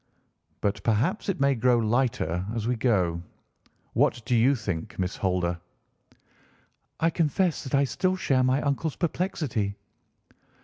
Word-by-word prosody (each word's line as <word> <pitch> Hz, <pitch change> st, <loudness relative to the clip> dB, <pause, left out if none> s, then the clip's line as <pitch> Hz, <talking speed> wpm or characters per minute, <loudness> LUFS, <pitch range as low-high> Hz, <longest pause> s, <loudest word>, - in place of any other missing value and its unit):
"But 100 Hz, +1 st, -1 dB
perhaps 125 Hz, -, 0 dB
it 195 Hz, -, -1 dB
may 140 Hz, 0 st, +4 dB
grow 125 Hz, 0 st, +3 dB
lighter 115 Hz, -7 st, 0 dB
as 115 Hz, -1 st, -2 dB
we 125 Hz, -, +1 dB
go. 95 Hz, -8 st, +1 dB, 0.7 s
What 120 Hz, -1 st, +2 dB
do 125 Hz, -, +1 dB
you 125 Hz, +5 st, +4 dB
think, 95 Hz, -9 st, -4 dB
Miss 90 Hz, -1 st, -2 dB
Holder?" 90 Hz, -2 st, 0 dB, 1.4 s
"I 165 Hz, +1 st, +2 dB
confess 165 Hz, +2 st, +1 dB
that 130 Hz, -, -2 dB
I 140 Hz, -, +4 dB
still 185 Hz, +7 st, 0 dB
share 135 Hz, -8 st, +1 dB
my 130 Hz, +2 st, +2 dB
uncle's 140 Hz, +2 st, -1 dB
perplexity." 150 Hz, -, -2 dB
125 Hz, 135 wpm, -26 LUFS, 105-140 Hz, 1.4 s, may